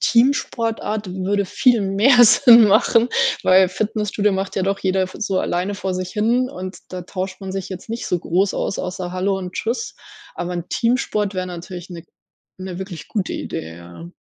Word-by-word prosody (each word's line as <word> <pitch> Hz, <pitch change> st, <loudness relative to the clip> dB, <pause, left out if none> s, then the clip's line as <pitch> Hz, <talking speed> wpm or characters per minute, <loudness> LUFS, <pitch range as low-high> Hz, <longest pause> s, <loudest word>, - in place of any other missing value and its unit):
Teamsportart 230 Hz, -4 st, +1 dB
würde 195 Hz, +2 st, -1 dB
viel 235 Hz, +4 st, +2 dB
mehr 225 Hz, +6 st, +5 dB
Sinn 235 Hz, 0 st, +7 dB
machen, 230 Hz, +4 st, +4 dB, 0.3 s
weil 185 Hz, 0 st, +5 dB
Fitnessstudio 210 Hz, +1 st, -1 dB
macht 190 Hz, +1 st, -3 dB
ja 190 Hz, -, +1 dB
doch 195 Hz, +1 st, 0 dB
jeder 190 Hz, 0 st, +1 dB
f 185 Hz, 0 st, -5 dB
so 195 Hz, -3 st, -1 dB
alleine 185 Hz, +3 st, -2 dB
vor 190 Hz, -1 st, -3 dB
sich 185 Hz, 0 st, -4 dB
hin 235 Hz, +4 st, +1 dB
und 185 Hz, -5 st, -7 dB
da 185 Hz, -1 st, -6 dB
tauscht 190 Hz, +2 st, -5 dB
man 190 Hz, -, -5 dB
sich 195 Hz, -1 st, -4 dB
jetzt 190 Hz, +2 st, -8 dB
nicht 230 Hz, +1 st, -4 dB
so 180 Hz, -, 0 dB
groß 185 Hz, +4 st, 0 dB
aus, -, -, -2 dB
außer 180 Hz, 0 st, -4 dB
„Hallo“ 190 Hz, +1 st, 0 dB
und 180 Hz, -1 st, -6 dB
„Tschüss“. 230 Hz, +4 st, -3 dB, 0.4 s
Aber 175 Hz, 0 st, -4 dB
'n 175 Hz, -, -4 dB
Teamsport 220 Hz, -4 st, 0 dB
wäre 185 Hz, 0 st, -2 dB
natürlich 180 Hz, 0 st, -8 dB
'ne 170 Hz, -2 st, -9 dB, 0.5 s
'ne 185 Hz, -1 st, -6 dB
wirklich 185 Hz, -5 st, -8 dB
gute 205 Hz, -4 st, -2 dB
Idee, 80 Hz, +1 st, -6 dB
ja. 85 Hz, 0 st, -11 dB
190 Hz, 180 wpm, -20 LUFS, 185-215 Hz, 0.5 s, Sinn